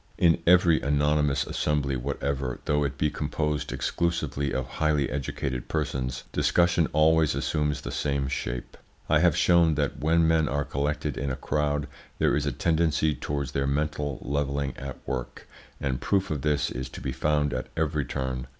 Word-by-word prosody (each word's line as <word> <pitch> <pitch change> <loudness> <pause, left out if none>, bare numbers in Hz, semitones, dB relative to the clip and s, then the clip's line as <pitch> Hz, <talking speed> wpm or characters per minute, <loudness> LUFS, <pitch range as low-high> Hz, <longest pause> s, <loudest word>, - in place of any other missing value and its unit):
In 85 -1 +4
every 90 -2 +5
anonymous 75 0 +2
assembly 70 -3 0
whatever, 70 0 -2
though 75 0 +2
it 70 -1 -2
be 75 -1 +1
composed 75 0 -2
exclusively 85 -5 -1
of 65 0 -1
highly 75 0 0
educated 65 -2 -3
persons, 65 0 -2
discussion 80 +3 +3
always 80 -1 +4
assumes 75 +1 -1
the - - -5
same 70 -2 -1
shape. - - -4 0.3
I 75 - +4
have 85 -2 +3
shown 85 -3 +4
that 70 -1 -1
when 80 +3 +3
men 80 -2 +3
are 70 +1 -1
collected 75 0 -2
in 70 +2 -2
a 65 - -2
crowd 75 +1 -1 0.3
there - - +2
is 75 0 0
a - - +1
tendency 80 +2 +1
towards 70 0 -3
their 70 0 0
mental 75 -1 -1
levelling 70 -1 -1
at 70 -2 -7
work, 65 -2 -5 0.3
and 65 -2 -2
proof 95 -3 +1
of 75 -3 -2
this 75 0 +1
is 65 +1 -4
to - - -9
be 65 - -3
found 75 +2 +1
at 65 0 -3
every 75 -3 0
turn. 65 0 -3
75 Hz, 170 wpm, -27 LUFS, 70-75 Hz, 0.3 s, every